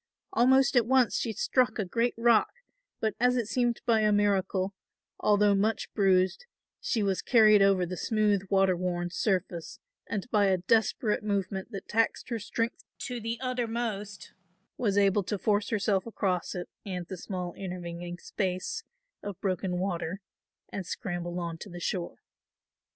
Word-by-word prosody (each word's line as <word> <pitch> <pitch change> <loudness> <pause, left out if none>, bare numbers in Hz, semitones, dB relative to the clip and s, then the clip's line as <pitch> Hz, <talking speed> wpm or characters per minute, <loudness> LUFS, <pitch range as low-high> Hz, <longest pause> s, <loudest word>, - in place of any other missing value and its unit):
Almost 265 0 +4
at 235 -2 +4
once 260 -2 +3
she 230 - -1
struck 245 +2 +1
a 210 - -1
great 230 +6 0
rock, 230 -1 +4 0.5
but, 220 -1 0
as 250 +1 +3
it 240 -3 0
seemed 240 +1 0
by 230 -3 +4
a 215 0 +3
miracle, 195 -2 +1 0.5
although 205 -1 +4
much 210 +3 0
bruised, 190 - +2 0.3
she 220 - 0
was 195 -2 0
carried 215 -4 +6
over 195 -2 +4
the 180 +1 -5
smooth 210 -1 +1
water 195 -2 +3
worn 175 -1 -2
surface 185 -6 -2 0.3
and 205 -1 -3
by 205 -2 +4
a 190 -1 +3
desperate 215 +3 +1
movement 195 -1 -2
that 200 -4 -7
taxed 225 +1 0
her 230 -2 -2
strength 230 +3 -3
to 250 -2 -4
the 230 +1 -3
uttermost, 230 -6 -3 0.4
was 205 -4 0
able 200 0 +4
to 200 +2 -3
force 205 +2 +1
herself 205 -2 0
across 190 -6 -1
it 175 -1 -4 0.2
and 180 -3 -4
the 190 - -6
small 180 -1 -5
intervening 175 -2 -6
space 185 0 -3 0.4
of 200 -4 -6
broken 185 -1 -1
water 180 -1 -2 0.5
and 185 -3 -5
scramble 175 -1 -4
on 170 -1 -4
to 205 - -9
the 175 -1 -8
shore. 175 0 -3
200 Hz, 155 wpm, -29 LUFS, 185-225 Hz, 0.5 s, carried